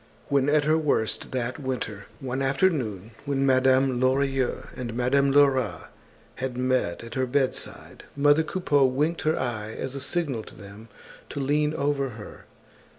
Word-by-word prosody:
When 140 Hz, 0 st, +2 dB
at 150 Hz, 0 st, +3 dB
her 155 Hz, +2 st, +3 dB
worst 140 Hz, -8 st, -1 dB
that 125 Hz, -1 st, -3 dB
winter, 125 Hz, -7 st, -4 dB
one 130 Hz, 0 st, -3 dB
afternoon, 135 Hz, -, 0 dB
when 135 Hz, -1 st, 0 dB
Madame 130 Hz, -1 st, +3 dB
Lorilleux 135 Hz, 0 st, 0 dB
and 120 Hz, -2 st, -5 dB
Madame 135 Hz, +3 st, +2 dB
Lerat 135 Hz, -5 st, +2 dB, 0.5 s
had 130 Hz, -1 st, -4 dB
met 125 Hz, -9 st, 0 dB
at 115 Hz, -1 st, -9 dB
her 130 Hz, 0 st, 0 dB
bedside, 130 Hz, +1 st, -3 dB
mother 145 Hz, +2 st, +4 dB
Coupeau 155 Hz, -3 st, +1 dB
winked 150 Hz, +6 st, 0 dB
her 155 Hz, +1 st, +1 dB
eye 110 Hz, -4 st, -3 dB
as 130 Hz, +3 st, -5 dB
a 140 Hz, -, -5 dB
signal 140 Hz, -5 st, -2 dB
to -, -, -13 dB
them 100 Hz, +3 st, -12 dB, 0.4 s
to -, -, -5 dB
lean 150 Hz, +2 st, +1 dB
over 140 Hz, -2 st, 0 dB
her. 105 Hz, -3 st, -11 dB
135 Hz, 150 wpm, -26 LUFS, 125-145 Hz, 0.5 s, mother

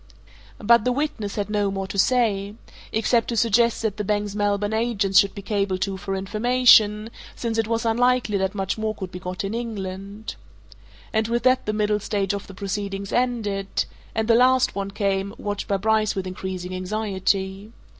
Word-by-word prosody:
But 235 Hz, +1 st, +4 dB
the 250 Hz, -, +1 dB
witness 255 Hz, -7 st, -2 dB
had 205 Hz, -2 st, -2 dB
no 205 Hz, -1 st, +1 dB
more 195 Hz, 0 st, -3 dB
to 195 Hz, +1 st, -4 dB
say 210 Hz, -4 st, +2 dB, 0.4 s
except 225 Hz, +1 st, +2 dB
to 235 Hz, -, -2 dB
suggest 230 Hz, +1 st, +3 dB
that 215 Hz, -2 st, -1 dB
the 210 Hz, -, -2 dB
bank's 205 Hz, 0 st, -1 dB
Melbourne 205 Hz, 0 st, 0 dB
agents 220 Hz, -4 st, +3 dB
should 200 Hz, -, +2 dB
be 200 Hz, -, -7 dB
cabled 200 Hz, -3 st, -1 dB
to 195 Hz, 0 st, -1 dB
for 195 Hz, 0 st, -4 dB
information, 215 Hz, +1 st, +4 dB, 0.2 s
since 230 Hz, -1 st, -2 dB
it 225 Hz, -, +1 dB
was 230 Hz, 0 st, -1 dB
unlikely 240 Hz, -2 st, +2 dB
that 190 Hz, +1 st, -1 dB
much 195 Hz, +2 st, -2 dB
more 220 Hz, 0 st, -1 dB
could 190 Hz, -3 st, -6 dB
be 180 Hz, -, -7 dB
got 180 Hz, +1 st, -5 dB
in 195 Hz, +2 st, -3 dB
England. 205 Hz, -2 st, -5 dB, 0.8 s
And 220 Hz, 0 st, +1 dB
with 235 Hz, 0 st, -1 dB
that 255 Hz, -2 st, +3 dB
the -, -, +2 dB
middle 210 Hz, 0 st, +1 dB
stage 200 Hz, -1 st, -1 dB
of 200 Hz, 0 st, -5 dB
the 195 Hz, -, -11 dB
proceedings 195 Hz, 0 st, -4 dB
ended 215 Hz, -6 st, 0 dB, 0.3 s
and 220 Hz, 0 st, 0 dB
the 230 Hz, -, +5 dB
last 255 Hz, +2 st, +4 dB
one 200 Hz, 0 st, -3 dB
came, 200 Hz, 0 st, -1 dB
watched 205 Hz, -1 st, -4 dB
by 200 Hz, -, +1 dB
Bryce 215 Hz, +1 st, +1 dB
with 190 Hz, -1 st, -3 dB
increasing 185 Hz, 0 st, -5 dB
anxiety. 195 Hz, +1 st, -2 dB
205 Hz, 185 wpm, -23 LUFS, 195-225 Hz, 0.8 s, the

